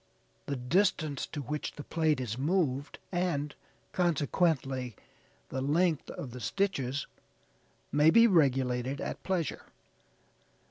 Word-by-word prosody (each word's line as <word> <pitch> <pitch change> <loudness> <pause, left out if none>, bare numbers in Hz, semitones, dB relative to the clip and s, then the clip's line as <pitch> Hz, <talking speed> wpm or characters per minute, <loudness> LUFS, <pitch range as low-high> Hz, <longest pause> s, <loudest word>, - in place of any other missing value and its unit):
The 140 - -1
distance 150 +2 +1
to 145 - -5
which 150 +4 -3
the 145 - -8
plate 155 -3 +1
is 120 -4 -3
moved, 145 -1 0
and, 170 -5 -1 0.4
consequently, 145 - +1 0.5
the 130 - -3
length 160 +3 +1
of 130 - -6
the 125 - -7
stitches 145 - -1 0.9
may 150 +2 +5
be 230 +7 +7
regulated 135 - +2
at - - -4
pleasure. 180 -4 -2
145 Hz, 110 wpm, -31 LUFS, 130-170 Hz, 0.9 s, be